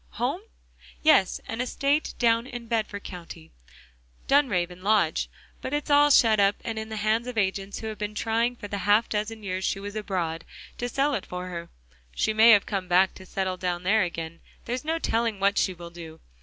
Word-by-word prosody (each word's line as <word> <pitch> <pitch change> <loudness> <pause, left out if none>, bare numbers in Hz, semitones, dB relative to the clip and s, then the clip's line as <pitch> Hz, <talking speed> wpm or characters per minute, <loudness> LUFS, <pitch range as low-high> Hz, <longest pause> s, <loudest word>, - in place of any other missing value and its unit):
"Home? - - -1 0.6
Yes, 190 - +4
an 225 +2 -3
estate 280 +4 0
down 230 0 +2
in 240 -2 -7
Bedford 220 -3 -2
County? 170 - -10 0.8
Dunraven 185 -11 +2
Lodge; 190 - +2 0.3
but 285 - -2
it's 295 0 -3
all 290 0 +6
shut 225 -6 +5
up, 200 0 +4
and 225 -1 -3
in 220 0 -6
the 220 - -5
hands 215 +3 0
of 250 -2 -6
agents 195 -1 -1
who - - -6
have 215 -2 -5
been 210 0 -4
trying 230 +3 0
for 215 -3 -8
the 200 0 -4
half 205 +4 +3
dozen 215 +1 -3
years 185 -1 -3
she 195 - 0
was 205 +1 -7
abroad, 175 -6 -2 0.4
to 245 - -2
sell 275 +4 +1
it - - -3
for 180 0 -5
her. 170 -1 -6 0.5
She 215 - +1
may 220 +2 +7
have 205 -3 +7
come 195 -3 -3
back 185 +1 +4
to 190 - -13
settle 190 -1 -2
down 180 -1 -2
there 215 +4 +3
again, 165 -2 -4 0.3
there's 245 +1 -3
no 320 +2 0
telling 230 -8 0
what 200 +1 +2
she 185 - 0
will 170 0 -10
do. 165 -2 -10
210 Hz, 200 wpm, -26 LUFS, 185-230 Hz, 0.8 s, may